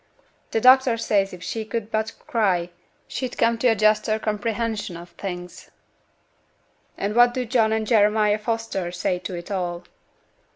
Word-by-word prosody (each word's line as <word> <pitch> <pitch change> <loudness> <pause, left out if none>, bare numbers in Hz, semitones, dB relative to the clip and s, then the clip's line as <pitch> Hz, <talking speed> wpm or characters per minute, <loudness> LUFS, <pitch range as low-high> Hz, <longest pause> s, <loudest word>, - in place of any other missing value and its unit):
T' 225 - 0
doctor 255 0 +6
says 200 -3 +1
if 180 -1 -10
she 225 +4 -3
could 220 0 -5
but 220 +1 -1
cry, 195 - 0 0.4
she'd 255 -2 -5
come 230 0 +2
to 250 - +3
a 225 - +4
juster 215 +1 +2
comprehension 215 -3 -2
of 175 +1 -11
things.' 180 -2 -8 1.3
'And 200 +1 -2
what 240 0 +5
do 255 -1 -1
John 225 -2 +2
and 220 0 0
Jeremiah 210 -1 +3
Foster 225 -5 -3
say 180 0 -1
to 180 - -6
it 175 +4 -8
all?' 175 -2 -3
215 Hz, 155 wpm, -23 LUFS, 195-230 Hz, 1.3 s, doctor